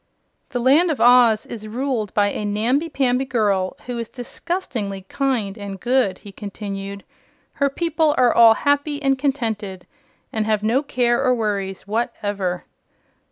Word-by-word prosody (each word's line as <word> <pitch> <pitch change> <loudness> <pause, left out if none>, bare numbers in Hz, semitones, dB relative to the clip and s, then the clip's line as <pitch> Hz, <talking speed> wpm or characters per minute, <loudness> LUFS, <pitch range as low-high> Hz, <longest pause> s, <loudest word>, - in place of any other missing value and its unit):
"The 245 - -2
Land 285 +8 +4
of 305 - -1
Oz 240 -3 +5
is 215 -2 -8
ruled 235 -2 -2
by 205 -1 +3
a - - -4
namby 235 +10 0
pamby 260 -3 +1
girl 200 -7 0
who 245 -1 -4
is 230 - -5
disgustingly 245 - -4
kind 225 -3 -2
and 200 -1 -6
good," 240 -5 +1
he 200 - -8
continued. 200 -1 -6 0.6
"Her 280 - +4
people 320 0 +1
are 245 -2 +4
all 230 -1 +7
happy 285 +2 0
and 270 -2 +2
contented 225 -9 -2 0.5
and 220 -1 -1
have 215 -1 +1
no 235 +5 +2
care 245 -3 +1
or 255 -2 +3
worries 200 -4 -3
whatever." 205 -4 -2
230 Hz, 150 wpm, -21 LUFS, 205-265 Hz, 0.6 s, all